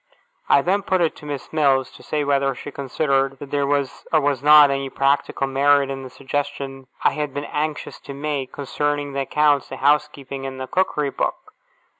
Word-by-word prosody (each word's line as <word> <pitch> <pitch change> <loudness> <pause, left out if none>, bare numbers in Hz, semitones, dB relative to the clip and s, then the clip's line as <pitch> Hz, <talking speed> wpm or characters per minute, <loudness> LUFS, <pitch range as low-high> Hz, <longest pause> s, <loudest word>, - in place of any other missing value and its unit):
I - - +5
then 195 +3 +1
put 185 -2 0
it 165 - +1
to 150 - -11
Miss 145 0 -6
Mills, 135 -4 +2
to - - -15
say 150 -1 -2
whether 140 -1 +1
she 145 - -8
considered 135 0 0
that 140 +1 -10
there 140 -1 +1
was 140 -2 -1
or 155 - +5
was 140 -3 0
not 150 -1 +8
any 135 0 -2
practical 135 0 +1
merit 140 +1 +3
in 135 0 -5
the 130 - -8
suggestion 140 -1 -4 0.2
I - - +5
had 150 -3 -4
been 145 0 -3
anxious 150 0 -3
to 140 - -9
make, 140 -2 -3
concerning 145 0 -2
the 140 - -2
accounts, 145 0 +2
the 135 - -6
housekeeping, 140 -1 0
and 130 0 -7
the 130 - -3
Cookery 150 -3 0
Book? - - -3
140 Hz, 195 wpm, -22 LUFS, 135-150 Hz, 0.2 s, not